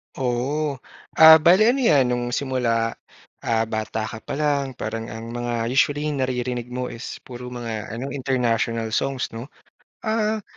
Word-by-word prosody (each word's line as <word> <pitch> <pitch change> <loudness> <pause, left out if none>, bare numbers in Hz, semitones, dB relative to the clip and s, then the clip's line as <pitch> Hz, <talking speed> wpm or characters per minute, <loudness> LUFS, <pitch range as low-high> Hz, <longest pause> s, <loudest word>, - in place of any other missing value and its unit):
Oo. 135 +3 -1 0.4
Ah, 160 0 +11
bale 185 +6 +6
ano 275 - -1
yan, 145 - +5
nung 120 0 -1
simula, 120 -4 0 0.5
ah, 115 -1 +1
bata 110 0 -3
ka 110 - -9
pa - - -5
lang 140 -3 +1
parang 115 +1 -4
ang 115 0 -7
mga 120 -1 -2
usually 145 +4 +1
naririnig 125 -2 -2
mo 125 0 -2
is 115 - -7
puro 125 0 -8
mga 115 -3 -5
ano 125 +4 -4
international 120 -4 0
songs 135 -3 -1
'no? 115 +2 -6 0.6
Ah 220 -1 0
125 Hz, 150 wpm, -23 LUFS, 115-140 Hz, 0.6 s, Ah